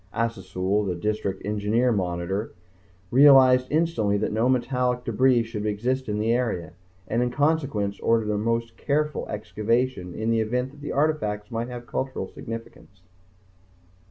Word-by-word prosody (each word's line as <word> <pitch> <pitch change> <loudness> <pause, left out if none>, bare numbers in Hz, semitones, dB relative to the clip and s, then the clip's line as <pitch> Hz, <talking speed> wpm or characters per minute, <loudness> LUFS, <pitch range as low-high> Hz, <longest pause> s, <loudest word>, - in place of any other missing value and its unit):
Assasul, 100 -3 -1
the 90 - -1
District 100 0 -2
Engineering 105 +3 +1
monitor, 90 +3 -2 0.6
realized 130 -1 +7
instantly 150 -11 +1
that - - -1
no 110 +4 +1
metallic 125 -1 0
debris 125 +1 +3
should 110 -2 -4
exist 120 +4 -1
in 105 - -1
that 105 - -1
area, 115 -9 0 0.3
and 115 - 0
in 125 - +1
consequence 135 -8 0
ordered 115 -2 +1
a - - 0
most 115 +1 -1
careful 150 +1 -1
excavation 110 -2 -1
in 110 +1 -1
the 115 - +2
event 125 +4 -1
that 145 0 -16
the 145 - -5
artifacts 125 -8 -1
might 115 +1 -2
have 120 -1 -7
cultural 130 -6 -3
significance. 110 -4 -9
115 Hz, 145 wpm, -25 LUFS, 105-125 Hz, 0.6 s, realized